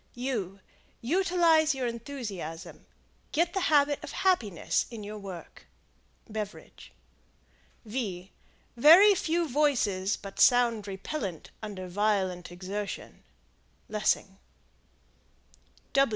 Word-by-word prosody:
Utilize 330 Hz, 0 st, +3 dB
your 260 Hz, -2 st, -2 dB
enthusiasms. 230 Hz, -, -6 dB, 0.4 s
Get 340 Hz, +2 st, +1 dB
the 390 Hz, -, 0 dB
habit 290 Hz, -1 st, +3 dB
of 300 Hz, -, -6 dB
happiness 235 Hz, -, +1 dB
in 230 Hz, -3 st, -8 dB, 0.2 s
work. 185 Hz, -4 st, -10 dB, 0.6 s
Beveridge. 215 Hz, -1 st, -7 dB, 0.9 s
Very 240 Hz, -, +3 dB
few 340 Hz, -2 st, 0 dB
voices 240 Hz, -9 st, +1 dB
but 195 Hz, -1 st, -10 dB
sound 235 Hz, -4 st, +4 dB
repellent 195 Hz, -, -5 dB
under 200 Hz, -4 st, -6 dB
violent 190 Hz, -2 st, 0 dB
exertion. 195 Hz, +3 st, -6 dB, 0.7 s
Lessing. 195 Hz, -2 st, -1 dB
220 Hz, 80 wpm, -29 LUFS, 195-300 Hz, 0.9 s, sound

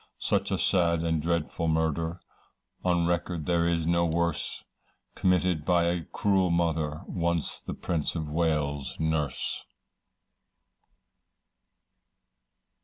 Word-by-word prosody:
Such -, -, +1 dB
a -, -, 0 dB
sad 85 Hz, -3 st, +2 dB
and 80 Hz, -2 st, 0 dB
dreadful 85 Hz, 0 st, -1 dB
murder, 80 Hz, +2 st, 0 dB, 0.6 s
On 85 Hz, -2 st, +2 dB
record 85 Hz, -2 st, -1 dB
there 85 Hz, -1 st, +2 dB
is 85 Hz, -1 st, 0 dB
no 85 Hz, +1 st, +3 dB
worse, 85 Hz, -1 st, -1 dB, 0.5 s
Committed 90 Hz, -3 st, +2 dB
by 85 Hz, +1 st, +3 dB
a 85 Hz, -1 st, 0 dB
cruel 95 Hz, -3 st, +1 dB
mother, 80 Hz, -3 st, 0 dB
Once 85 Hz, -2 st, -1 dB
the -, -, -6 dB
Prince 80 Hz, -2 st, -1 dB
of 80 Hz, -2 st, -2 dB
Wales' 75 Hz, -3 st, -1 dB
Nurse. 80 Hz, -4 st, -1 dB
85 Hz, 110 wpm, -28 LUFS, 80-85 Hz, 0.6 s, no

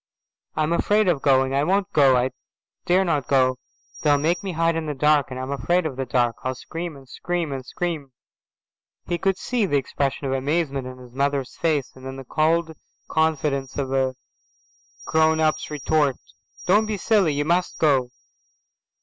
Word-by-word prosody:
"I'm 155 Hz, +1 st, +1 dB
afraid 210 Hz, +4 st, +2 dB
of 165 Hz, -6 st, +2 dB
going. 135 Hz, -1 st, +3 dB
I 140 Hz, +1 st, +2 dB
won't 190 Hz, +3 st, +1 dB
go. 135 Hz, -3 st, +5 dB
I 125 Hz, +1 st, +1 dB, 0.6 s
daren't 175 Hz, -7 st, +2 dB
go. 130 Hz, -2 st, +3 dB, 0.4 s
They'll 145 Hz, -2 st, +4 dB
make 165 Hz, +5 st, 0 dB
me 195 Hz, -2 st, -4 dB
hide 165 Hz, 0 st, +1 dB
in 165 Hz, -1 st, -3 dB
the 150 Hz, -, -3 dB
dark, 150 Hz, -1 st, +3 dB
and 130 Hz, 0 st, -6 dB
I'm 130 Hz, +1 st, -4 dB
afraid 175 Hz, +5 st, +1 dB
of 150 Hz, -5 st, -3 dB
the 135 Hz, 0 st, -4 dB
dark. 120 Hz, -1 st, +1 dB
I'll 130 Hz, 0 st, -2 dB
scream 165 Hz, +5 st, -6 dB
and 135 Hz, -1 st, -15 dB
scream 175 Hz, +2 st, -3 dB
and 135 Hz, -1 st, -4 dB
scream." 155 Hz, -1 st, -4 dB, 0.9 s
He 175 Hz, -1 st, -2 dB
could 195 Hz, -1 st, +1 dB
see 240 Hz, -5 st, 0 dB
the 145 Hz, -, +2 dB
expression 140 Hz, +1 st, -2 dB
of 135 Hz, -, -1 dB
amazement 140 Hz, -1 st, -1 dB
on 130 Hz, 0 st, -9 dB
his 125 Hz, -1 st, -14 dB
mother's 140 Hz, -1 st, -1 dB
face, 150 Hz, -5 st, 0 dB
and 130 Hz, -, -14 dB
then 130 Hz, 0 st, -6 dB
the 135 Hz, -, -8 dB
cold 160 Hz, +3 st, +1 dB, 0.4 s
confidence 150 Hz, -4 st, 0 dB
of 135 Hz, -2 st, -2 dB
a 130 Hz, -1 st, +1 dB, 0.9 s
grown 160 Hz, 0 st, +3 dB
up's 155 Hz, -1 st, +1 dB
retort. 150 Hz, -2 st, +1 dB, 0.5 s
"Don't 210 Hz, +4 st, +4 dB
be 215 Hz, -1 st, -2 dB
silly. 195 Hz, -6 st, +2 dB
You 145 Hz, +1 st, 0 dB
must 175 Hz, +3 st, 0 dB
go. 135 Hz, -5 st, +2 dB
150 Hz, 175 wpm, -23 LUFS, 135-165 Hz, 0.9 s, go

